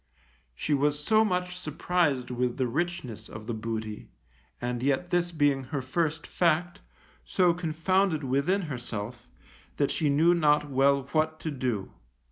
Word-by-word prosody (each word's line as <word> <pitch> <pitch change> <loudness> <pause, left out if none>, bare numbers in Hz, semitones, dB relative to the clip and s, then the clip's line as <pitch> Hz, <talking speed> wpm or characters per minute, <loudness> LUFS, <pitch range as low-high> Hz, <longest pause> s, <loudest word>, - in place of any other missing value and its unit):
She 150 - -1
was 145 +1 +2
so 220 +8 +4
much 180 -3 -1
surprised 155 -5 0
with 125 0 -1
the 130 - +1
richness 130 - -3
of 110 0 -9
this 115 0 -3
booty, 110 -1 -5 0.5
and 120 0 -2
yet 140 +7 0
this 175 0 +1
being 145 -4 +2
her 140 0 -3
first 160 +2 -1
fact, 175 +2 +1 0.4
so 180 -2 +3
confounded 170 0 +1
within 140 +10 +1
herself, 120 -5 -6 0.5
that 140 - +2
she 155 -3 +1
knew 160 +5 +5
not 150 -3 +3
well 140 0 +3
what 155 0 +1
to 155 - -3
do. 125 -8 -2
150 Hz, 145 wpm, -28 LUFS, 125-170 Hz, 0.5 s, knew